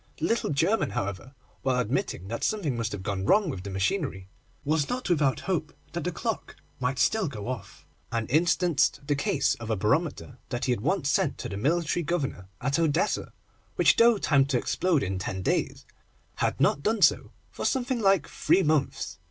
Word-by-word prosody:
The -, -, -2 dB
little 230 Hz, -, 0 dB
German, 175 Hz, +10 st, +1 dB
however, 100 Hz, +7 st, -4 dB, 0.3 s
while 130 Hz, -1 st, +1 dB
admitting 120 Hz, -, -2 dB
that 115 Hz, +3 st, -4 dB
something 190 Hz, -, 0 dB
must 115 Hz, -1 st, -2 dB
have 100 Hz, -3 st, -5 dB
gone 95 Hz, 0 st, -2 dB
wrong 190 Hz, -, +3 dB
with 95 Hz, -, -6 dB
the 100 Hz, -, -7 dB
machinery, 95 Hz, -, -1 dB, 0.4 s
was 150 Hz, 0 st, +1 dB
not 250 Hz, -6 st, -2 dB
without 140 Hz, -7 st, +2 dB
hope -, -, -2 dB, 0.2 s
that -, -, -4 dB
the -, -, 0 dB
clock -, -, -4 dB, 0.2 s
might 125 Hz, +1 st, -1 dB
still 215 Hz, +8 st, +2 dB
go 110 Hz, -7 st, -6 dB
off, 125 Hz, -5 st, -7 dB, 0.3 s
and 115 Hz, -2 st, -1 dB
instanced 165 Hz, 0 st, +2 dB
the 145 Hz, -, +1 dB
case 140 Hz, 0 st, +1 dB
of 115 Hz, -1 st, -7 dB
a 110 Hz, -, +1 dB
barometer 130 Hz, -, -1 dB
that 120 Hz, -2 st, -2 dB
he 125 Hz, -, +1 dB
had 120 Hz, -, -1 dB
once 160 Hz, -, 0 dB
sent 145 Hz, 0 st, +1 dB
to 125 Hz, -, -5 dB
the 100 Hz, -, -5 dB
military 160 Hz, -, 0 dB
Governor 145 Hz, -, -2 dB
at 140 Hz, +5 st, 0 dB
Odessa, 165 Hz, +4 st, +1 dB, 0.4 s
which, -, -, +5 dB
though 230 Hz, -1 st, +5 dB
timed 140 Hz, -7 st, +3 dB
to 130 Hz, -, +2 dB
explode 165 Hz, +4 st, +1 dB
in 95 Hz, -1 st, -2 dB
ten 95 Hz, 0 st, -4 dB
days, -, -, -1 dB, 0.5 s
had -, -, 0 dB
not 140 Hz, -, +3 dB
done 215 Hz, +4 st, +1 dB
so -, -, +4 dB, 0.2 s
for -, -, -6 dB
something 255 Hz, -1 st, 0 dB
like 195 Hz, -4 st, +3 dB
three 190 Hz, -, +2 dB
months. 150 Hz, -2 st, 0 dB
140 Hz, 190 wpm, -27 LUFS, 115-175 Hz, 0.5 s, which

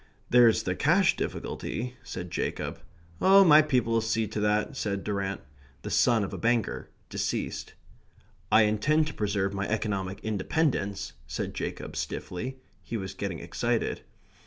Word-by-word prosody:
"There's 120 Hz, -2 st, +6 dB
the 90 Hz, -, 0 dB
cash 170 Hz, -, +3 dB
difficulty," 125 Hz, +2 st, -4 dB
said 90 Hz, -2 st, -7 dB
Jacob. 90 Hz, -, -3 dB, 0.4 s
"My 190 Hz, -5 st, +8 dB
people'll 125 Hz, -6 st, +1 dB
see 115 Hz, 0 st, 0 dB
to -, -, -3 dB
that," 105 Hz, +6 st, +1 dB
said 100 Hz, -6 st, -2 dB
Durrant 100 Hz, -2 st, -2 dB, 0.4 s
(the -, -, -5 dB
son 115 Hz, -4 st, +4 dB
of 100 Hz, -, -5 dB
a -, -, -5 dB
banker, 115 Hz, -1 st, 0 dB, 0.2 s
deceased). -, -, -3 dB, 0.8 s
"I 110 Hz, -, +7 dB
intend 125 Hz, +10 st, +2 dB
to 150 Hz, -, -5 dB
preserve 100 Hz, -3 st, -1 dB
my 100 Hz, 0 st, -2 dB
economic 100 Hz, -3 st, -2 dB
independence," 100 Hz, -2 st, -1 dB
said 65 Hz, -, -4 dB
Jacob -, -, -5 dB
stiffly. 125 Hz, +9 st, -4 dB, 0.2 s
(He 115 Hz, -, -4 dB
was 95 Hz, -2 st, -5 dB
getting 95 Hz, -3 st, -4 dB
excited.) -, -, -1 dB
110 Hz, 135 wpm, -28 LUFS, 100-125 Hz, 0.8 s, My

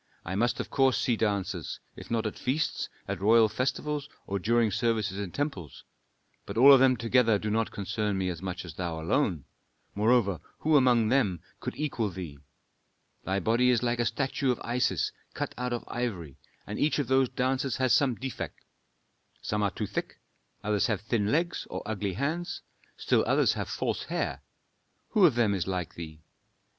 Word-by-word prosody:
"I 90 Hz, -, -4 dB
must 120 Hz, +4 st, +1 dB
of -, -, -4 dB
course 135 Hz, -2 st, +3 dB
see 120 Hz, -, +1 dB
dancers, 105 Hz, -3 st, -2 dB, 0.2 s
if -, -, -11 dB
not 115 Hz, -1 st, 0 dB
at 110 Hz, -, -4 dB
feasts, 150 Hz, +4 st, -1 dB, 0.2 s
at 100 Hz, -2 st, -4 dB
royal 110 Hz, +2 st, +6 dB
festivals, 140 Hz, +5 st, -2 dB, 0.2 s
or 100 Hz, 0 st, -2 dB
during 115 Hz, +2 st, +2 dB
services 105 Hz, -2 st, 0 dB
in 100 Hz, -2 st, -3 dB
temples. 100 Hz, -, -4 dB, 0.6 s
But -, -, -5 dB
all 140 Hz, +4 st, +9 dB
of 135 Hz, -, +7 dB
them 130 Hz, -1 st, +5 dB
together 115 Hz, -1 st, +3 dB
do 105 Hz, +1 st, -3 dB
not 110 Hz, +1 st, +1 dB
concern 105 Hz, 0 st, -2 dB
me 95 Hz, -1 st, -1 dB
as 85 Hz, -2 st, -5 dB
much 95 Hz, 0 st, -5 dB
as 85 Hz, -, -8 dB
thou 85 Hz, -1 st, -4 dB
alone; 85 Hz, -, 0 dB, 0.5 s
moreover, 105 Hz, -3 st, +2 dB, 0.2 s
who 155 Hz, 0 st, +3 dB
among 125 Hz, -5 st, +4 dB
them 105 Hz, -9 st, +2 dB, 0.2 s
could 125 Hz, -, -5 dB
equal 130 Hz, -8 st, -1 dB
thee? 85 Hz, -6 st, -7 dB, 0.9 s
Thy 95 Hz, +1 st, 0 dB
body 115 Hz, +4 st, +3 dB
is 125 Hz, -1 st, +3 dB
like 120 Hz, 0 st, 0 dB
a 120 Hz, -, +2 dB
statue 135 Hz, +1 st, -1 dB
of 125 Hz, -, +1 dB
Isis, 120 Hz, +1 st, 0 dB, 0.2 s
cut -, -, -3 dB
out 125 Hz, 0 st, -3 dB
of 120 Hz, -, -2 dB
ivory, 95 Hz, -, -4 dB, 0.3 s
and 105 Hz, -, -5 dB
each 150 Hz, -, +2 dB
of 145 Hz, -, 0 dB
those 130 Hz, -1 st, +3 dB
dancers 130 Hz, 0 st, -1 dB
has 130 Hz, -3 st, +2 dB
some 130 Hz, -1 st, +3 dB
defect. 130 Hz, +1 st, -6 dB, 0.8 s
Some 105 Hz, 0 st, -1 dB
are 100 Hz, -, +2 dB
too -, -, -4 dB
thick; -, -, -4 dB, 0.5 s
others 105 Hz, -1 st, +1 dB
have 105 Hz, -5 st, -1 dB
thin 110 Hz, -1 st, 0 dB
legs 170 Hz, +3 st, 0 dB
or -, -, -5 dB
ugly 105 Hz, -3 st, -2 dB
hands; 160 Hz, -, -3 dB, 0.3 s
still -, -, +2 dB
others -, -, +3 dB
have -, -, -4 dB
false -, -, -2 dB
hair. -, -, -2 dB, 0.7 s
Who 205 Hz, -5 st, +6 dB
of 140 Hz, -, 0 dB
them 115 Hz, -4 st, +3 dB
is 95 Hz, -3 st, -2 dB
like 90 Hz, -3 st, -3 dB
thee? 80 Hz, -2 st, -9 dB
115 Hz, 180 wpm, -28 LUFS, 100-130 Hz, 0.9 s, all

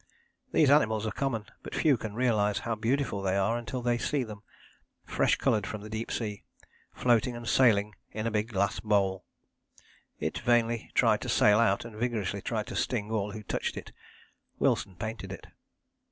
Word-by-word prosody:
These 145 Hz, -3 st, +4 dB
animals 110 Hz, -7 st, +3 dB
are 110 Hz, -, -1 dB
common, 120 Hz, -6 st, -2 dB, 0.2 s
but -, -, -7 dB
few 150 Hz, -4 st, +4 dB
can 110 Hz, -3 st, -6 dB
realize 110 Hz, -4 st, +2 dB
how 115 Hz, -, 0 dB
beautiful 115 Hz, -1 st, -1 dB
they 95 Hz, 0 st, 0 dB
are 100 Hz, +4 st, +2 dB
until 120 Hz, +1 st, -4 dB
they 120 Hz, 0 st, +1 dB
see 145 Hz, 0 st, 0 dB
them, 105 Hz, -3 st, -9 dB, 0.6 s
fresh -, -, +2 dB
coloured 105 Hz, -, +1 dB
from 110 Hz, -, -5 dB
the 105 Hz, +1 st, -9 dB
deep 110 Hz, +1 st, -4 dB
sea, 105 Hz, -3 st, -3 dB, 0.5 s
floating 120 Hz, 0 st, +2 dB
and 120 Hz, -1 st, -7 dB
sailing 105 Hz, -5 st, +4 dB, 0.2 s
in 110 Hz, +1 st, -4 dB
a 115 Hz, -, 0 dB
big 105 Hz, 0 st, 0 dB
glass 100 Hz, -3 st, 0 dB
bowl. 100 Hz, -3 st, +1 dB, 0.9 s
It -, -, -2 dB
vainly 120 Hz, -1 st, +1 dB
tried -, -, +4 dB
to -, -, -4 dB
sail 105 Hz, +1 st, +5 dB
out, 115 Hz, -2 st, +2 dB
and 115 Hz, -2 st, -9 dB
vigorously 110 Hz, -5 st, -2 dB
tried -, -, -2 dB
to -, -, -7 dB
sting 105 Hz, +1 st, -1 dB
all 105 Hz, -2 st, -1 dB
who 110 Hz, -, -7 dB
touched -, -, -3 dB
it. -, -, -8 dB, 0.7 s
Wilson 95 Hz, -3 st, +1 dB
painted 110 Hz, -1 st, -5 dB
it. 95 Hz, -, -8 dB
110 Hz, 180 wpm, -29 LUFS, 105-120 Hz, 0.9 s, sail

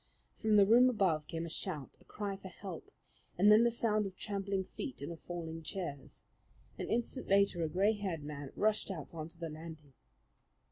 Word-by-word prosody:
From 220 Hz, -2 st, +3 dB
the 200 Hz, -1 st, +8 dB
room 240 Hz, +5 st, +7 dB
above 180 Hz, -10 st, +1 dB
came 165 Hz, 0 st, -3 dB
a -, -, -5 dB
shout, 150 Hz, -3 st, -4 dB
a -, -, -21 dB
cry 205 Hz, -2 st, -4 dB
for 195 Hz, 0 st, -10 dB
help, 185 Hz, -2 st, -8 dB, 0.5 s
and 205 Hz, +4 st, +7 dB
then 215 Hz, +2 st, +8 dB
the 235 Hz, -, +5 dB
sound 215 Hz, -3 st, +1 dB
of 185 Hz, -1 st, -10 dB
trampling 200 Hz, -2 st, -2 dB
feet 265 Hz, -, -6 dB
and 140 Hz, +4 st, -5 dB
of 165 Hz, -, -8 dB
falling 165 Hz, -2 st, -6 dB
chairs. 145 Hz, -5 st, -6 dB, 0.6 s
An -, -, -3 dB
instant 240 Hz, +3 st, -1 dB
later 195 Hz, -3 st, +4 dB
a 160 Hz, -, 0 dB
gray 195 Hz, +6 st, +3 dB
haired 190 Hz, -7 st, -3 dB
man 145 Hz, -2 st, -6 dB
rushed 215 Hz, 0 st, +2 dB
out 170 Hz, -6 st, -6 dB
on 160 Hz, -1 st, -5 dB
the 165 Hz, -, -3 dB
landing. 155 Hz, -2 st, -9 dB
190 Hz, 190 wpm, -34 LUFS, 160-210 Hz, 0.6 s, the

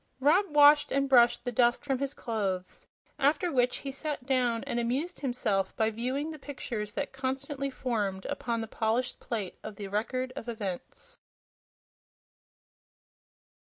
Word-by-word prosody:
Rob 320 Hz, +9 st, +4 dB
washed 295 Hz, 0 st, +6 dB
and 275 Hz, 0 st, +2 dB
brushed 240 Hz, -2 st, +5 dB
the 245 Hz, -, -1 dB
dust 240 Hz, +2 st, +2 dB
from 270 Hz, -3 st, 0 dB
his 275 Hz, 0 st, -2 dB
clothes, 195 Hz, -6 st, -3 dB, 0.3 s
after 300 Hz, +5 st, +2 dB
which 250 Hz, -3 st, +2 dB
he 275 Hz, -, -5 dB
sat 285 Hz, -1 st, -4 dB
down 250 Hz, -3 st, +1 dB
and 240 Hz, -, -2 dB
amused 265 Hz, +9 st, -1 dB
himself 210 Hz, -8 st, 0 dB
by 220 Hz, -1 st, +2 dB
viewing 260 Hz, +7 st, -2 dB
the 310 Hz, -, -8 dB
pictures 235 Hz, -7 st, -5 dB
that 285 Hz, -, -3 dB
constantly 270 Hz, +1 st, -3 dB
formed 210 Hz, -8 st, -2 dB
upon 230 Hz, -2 st, -2 dB
the 225 Hz, -, -4 dB
polished 225 Hz, +3 st, -1 dB
plate 210 Hz, -6 st, -4 dB
of 215 Hz, -1 st, -7 dB
the 200 Hz, -1 st, -6 dB
Record 255 Hz, +5 st, -2 dB
of 235 Hz, -, -6 dB
Events. 220 Hz, -, -6 dB
250 Hz, 145 wpm, -29 LUFS, 225-275 Hz, 0.3 s, washed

